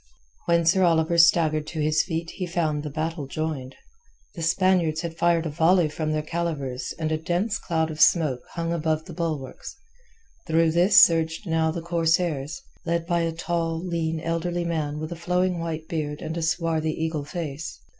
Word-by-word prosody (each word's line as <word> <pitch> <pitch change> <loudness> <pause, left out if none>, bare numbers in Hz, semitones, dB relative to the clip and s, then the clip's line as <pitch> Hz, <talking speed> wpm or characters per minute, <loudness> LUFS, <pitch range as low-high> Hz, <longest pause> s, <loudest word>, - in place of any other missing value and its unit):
When 170 -1 +3
Sir 185 +4 +4
Oliver 170 -1 +3
staggered 160 -2 +4
to 160 - -5
his 155 0 +3
feet 165 0 -4
he 185 -2 -5
found 160 -4 -1
the 150 - -5
battle 155 0 -3
joined. 140 -3 -4 0.6
The 170 - -7
Spaniards 170 -2 +2
had 170 -2 -5
fired 170 0 +2
a 160 - -2
volley 165 +2 +3
from 155 0 -3
their 155 0 -1
calivers 140 -7 -3
and 155 -1 -2
a 155 - 0
dense 175 +7 -1
cloud 160 -1 -1
of 155 - -5
smoke 150 -8 +4
hung 170 0 -2
above 160 -1 -1
the - - -9
bulwarks; 155 - -4 0.7
through 165 0 +3
this 180 +4 +6
surged 165 +3 +4
now 160 -2 +1
the 165 +1 -4
corsairs, 165 - 0 0.2
led 170 -1 -1
by 170 0 +1
a 165 -1 0
tall, 165 0 -2
lean, 165 -2 -2
elderly 170 +2 -2
man 155 -3 -2
with 155 +1 -5
a - - -3
flowing 180 +1 0
white 160 -1 -4
beard 150 -2 -3
and 160 +1 -4
a 170 - -2
swarthy 160 -1 0
eagle 160 -2 -2
face. 155 -1 -6
165 Hz, 180 wpm, -25 LUFS, 155-170 Hz, 0.7 s, this